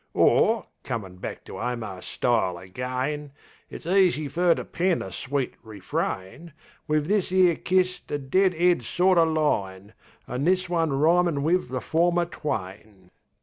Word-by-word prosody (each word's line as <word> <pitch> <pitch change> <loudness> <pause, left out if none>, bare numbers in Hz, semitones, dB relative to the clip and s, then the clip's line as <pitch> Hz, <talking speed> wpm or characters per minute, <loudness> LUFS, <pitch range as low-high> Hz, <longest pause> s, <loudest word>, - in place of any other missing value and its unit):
Or, 225 -3 +3 0.2
comin' 105 -8 -5
back - - -7
to - - -8
Omar's 115 -6 -4
style 110 -8 0
again, 130 +9 -4 0.4
It's - - -10
easy 180 -4 +3
fer 175 +1 +3
to - - -5
pen 180 0 0
a 95 - -8
sweet 130 +7 -3
refrain 110 - -5 0.3
Wiv 150 -1 +1
this 200 -2 +1
'ere 185 -2 +4
kist 185 +1 0
a 145 - -1
dead 180 +7 +2
'ead 175 -2 +3
sort 180 +9 +2
o' 165 - +6
line, 105 -11 -1 0.3
An' 125 +2 -3
this 185 +1 +2
one 165 -3 0
rhymin' 160 +1 +2
wiv 170 -2 +1
the 130 -1 -3
former 175 +1 +2
twain. 95 - -6
150 Hz, 145 wpm, -25 LUFS, 115-175 Hz, 0.4 s, o